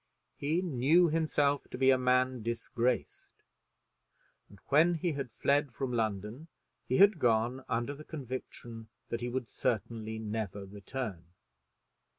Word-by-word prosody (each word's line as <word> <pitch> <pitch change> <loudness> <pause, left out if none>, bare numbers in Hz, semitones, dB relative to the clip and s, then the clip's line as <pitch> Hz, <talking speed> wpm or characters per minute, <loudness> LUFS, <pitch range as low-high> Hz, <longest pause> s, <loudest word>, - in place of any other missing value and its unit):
He 160 +6 0
knew 165 +3 +4
himself 150 -3 +1
to - - -6
be 135 +1 +5
a 130 - +4
man 125 0 +2
disgraced, 115 +2 -2 1.1
and 100 - -15
when 160 +5 +5
he 170 +2 -1
had 140 -4 -4
fled 140 +4 +1
from 130 -2 -2
London 110 - -2 0.4
he 130 - +1
had 200 -3 +6
gone 120 +1 +2
under 120 +3 -1
the 150 +2 -10
conviction 125 -5 -7 0.2
that 115 - -3
he 120 - -2
would 125 -1 -3
certainly 110 0 -2
never 105 -2 -4
return. 100 -2 -6
125 Hz, 135 wpm, -31 LUFS, 115-145 Hz, 1.1 s, had